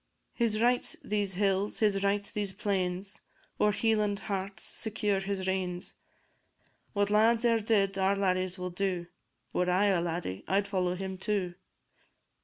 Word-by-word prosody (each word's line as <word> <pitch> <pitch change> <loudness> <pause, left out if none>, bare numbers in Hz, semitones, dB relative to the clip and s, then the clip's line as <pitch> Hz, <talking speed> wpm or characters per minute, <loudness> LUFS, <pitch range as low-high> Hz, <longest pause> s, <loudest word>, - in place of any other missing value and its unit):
His 225 -3 +1
right 245 +2 +2
these 205 -3 -1
hills, 195 +1 +1
his 200 -2 +2
right 200 +1 +2
these 205 -2 -2
plains; 190 -1 -2 0.4
Ower 210 - +4
Hieland 210 -1 +1
hearts 195 -2 -4
secure 210 -2 -1
he 195 +1 -2
reigns; 185 -1 -2 1.0
What 205 -1 +1
lads 225 +2 +4
e'er 230 -1 +4
did 200 -3 +1
our 190 +1 +3
laddies 185 -1 0
will 180 0 -4
do; 180 -1 -1 0.5
Were 180 0 +1
I 195 +3 +3
a 185 -3 +2
laddie, 165 - -3
I'd 200 +1 +2
follow 180 -3 0
him 190 0 -5
too. 190 -3 -1
195 Hz, 145 wpm, -30 LUFS, 185-210 Hz, 1.0 s, Ower